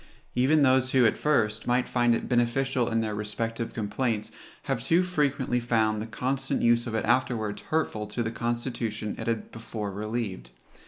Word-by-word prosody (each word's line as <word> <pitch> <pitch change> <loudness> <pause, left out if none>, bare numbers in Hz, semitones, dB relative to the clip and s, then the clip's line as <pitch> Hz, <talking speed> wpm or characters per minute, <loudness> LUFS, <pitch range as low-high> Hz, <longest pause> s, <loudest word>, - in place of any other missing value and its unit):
Even 140 +4 +4
those 130 -1 +3
who, 130 -2 +5
at 110 - +3
first, 110 -7 +1
might 125 0 +2
find 120 -1 +3
it - - -3
beneficial 125 +1 +1
in 115 0 +1
their 110 -1 -2
respective 115 +2 -3
complaints, 110 0 -1 0.3
have 130 -4 -2
too 170 +7 +3
frequently 145 -8 0
found 110 -3 +1
the 110 - -5
constant 130 +4 -1
use 120 +1 +3
of 115 - -3
it 110 - 0
afterwards 115 -3 0
hurtful 130 -9 -1
to 105 +3 -2
the 115 - -2
constitution 115 -2 -3
it - - -5
had 115 -1 -2
before 110 -2 -5
relieved. 105 - -4
120 Hz, 170 wpm, -27 LUFS, 110-130 Hz, 0.3 s, who